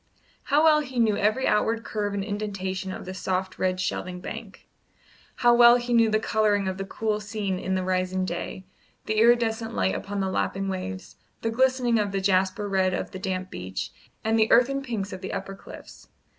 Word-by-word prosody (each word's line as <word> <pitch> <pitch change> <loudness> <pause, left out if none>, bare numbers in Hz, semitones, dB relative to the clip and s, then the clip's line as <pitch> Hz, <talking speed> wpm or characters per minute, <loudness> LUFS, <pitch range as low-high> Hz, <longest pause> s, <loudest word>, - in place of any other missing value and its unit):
How 295 +2 +3
well 310 -1 +6
he 260 -4 -6
knew 220 -3 +3
every 215 +6 +1
outward 225 +2 +1
curve 205 -2 -3
and 200 - -1
indentation 195 -2 -3
of - - -7
the 185 - -6
soft 185 0 -3
red 185 0 0
shelving 185 -1 -3
bank! - - -9 0.7
how 240 0 +4
well 240 0 +8
he 245 0 -1
knew 230 -1 +5
the 215 - +3
colouring 210 -3 +1
of 190 0 -3
the 195 - -3
cool 215 +1 -2
scene 205 -3 -3
in 190 0 -1
the 185 - -1
rising 185 0 0
day, 185 +1 -5 0.4
the 215 0 0
iridescent 230 -1 +3
light 95 0 +1
upon 200 0 -4
the 190 -1 -1
lapping 195 +1 -1
waves, 190 0 -5 0.3
the 225 - 0
glistening 255 -1 +2
of 205 -2 -1
the 195 - 0
jasper 190 +1 +1
red 190 -2 +1
of - - -4
the 190 - -7
damp 185 0 -3
beach, 95 +1 -5 0.3
and 225 +1 +2
the 220 - +3
earthen 275 +3 +4
pinks 220 -7 -4
of 185 - -7
the 190 - -5
upper 195 0 -4
cliffs! 195 - -13
200 Hz, 200 wpm, -26 LUFS, 185-225 Hz, 0.7 s, well